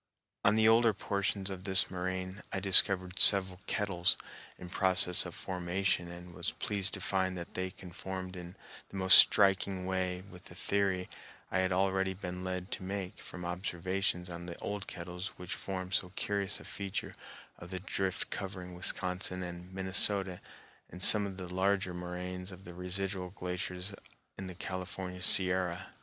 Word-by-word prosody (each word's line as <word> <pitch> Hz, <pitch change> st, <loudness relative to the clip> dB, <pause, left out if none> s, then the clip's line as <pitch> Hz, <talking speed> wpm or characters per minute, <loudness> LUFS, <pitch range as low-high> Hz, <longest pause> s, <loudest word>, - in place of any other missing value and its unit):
On 100 Hz, -, +4 dB
the 110 Hz, 0 st, +3 dB
older 115 Hz, 0 st, +4 dB
portions 100 Hz, 0 st, -3 dB
of 95 Hz, -1 st, -8 dB
this 95 Hz, -1 st, +6 dB
moraine 95 Hz, +1 st, -5 dB
I -, -, -3 dB
discovered 95 Hz, -1 st, +6 dB
several 95 Hz, -2 st, +8 dB
kettles 90 Hz, -3 st, 0 dB, 0.4 s
in 90 Hz, -, -10 dB
process 95 Hz, -2 st, +7 dB
of -, -, -11 dB
formation 90 Hz, -1 st, -2 dB
and 90 Hz, 0 st, -11 dB
was -, -, -3 dB
pleased 100 Hz, -2 st, -1 dB
to -, -, -7 dB
find 95 Hz, -1 st, -1 dB
that 85 Hz, -, -9 dB
they 95 Hz, 0 st, -3 dB
conformed 95 Hz, +1 st, -8 dB
in 90 Hz, 0 st, -10 dB, 0.3 s
the -, -, -12 dB
most 95 Hz, 0 st, +6 dB
striking 95 Hz, -2 st, +5 dB
way 90 Hz, -1 st, -3 dB
with 90 Hz, -2 st, -15 dB
the 85 Hz, -, -13 dB
theory 95 Hz, -1 st, -1 dB, 0.4 s
I 95 Hz, -, 0 dB
had 95 Hz, 0 st, 0 dB
already 95 Hz, 0 st, 0 dB
been 90 Hz, -1 st, -7 dB
led 90 Hz, 0 st, -5 dB
to -, -, -4 dB
make 95 Hz, -1 st, -6 dB
from 90 Hz, -1 st, -9 dB
observations 90 Hz, +1 st, -3 dB
on 85 Hz, 0 st, -9 dB
the 85 Hz, -, -8 dB
old 100 Hz, -1 st, -6 dB
kettles 90 Hz, +2 st, -8 dB
which 90 Hz, -1 st, -7 dB
form 95 Hz, -1 st, -6 dB
so 90 Hz, -1 st, -1 dB
curious 100 Hz, -1 st, 0 dB
a -, -, -13 dB
feature 100 Hz, -1 st, -6 dB, 0.5 s
of 85 Hz, -, -11 dB
the 95 Hz, 0 st, -5 dB
drift 95 Hz, 0 st, -3 dB
covering 95 Hz, -3 st, -6 dB
Wisconsin 90 Hz, +1 st, -3 dB
and 90 Hz, +1 st, -9 dB
Minnesota 95 Hz, 0 st, 0 dB, 0.5 s
and 90 Hz, -, -11 dB
some 105 Hz, 0 st, +6 dB
of 95 Hz, -1 st, -9 dB
the 90 Hz, -2 st, -8 dB
larger 95 Hz, 0 st, 0 dB
moraines 90 Hz, +1 st, -7 dB
of 90 Hz, +1 st, -13 dB
the 90 Hz, -, -11 dB
residual 90 Hz, +1 st, -4 dB
glaciers 90 Hz, +1 st, -6 dB, 0.4 s
in 95 Hz, -, -8 dB
the 90 Hz, -, -9 dB
California 90 Hz, 0 st, -7 dB
Sierra. 90 Hz, -1 st, +1 dB
95 Hz, 165 wpm, -31 LUFS, 90-95 Hz, 0.5 s, several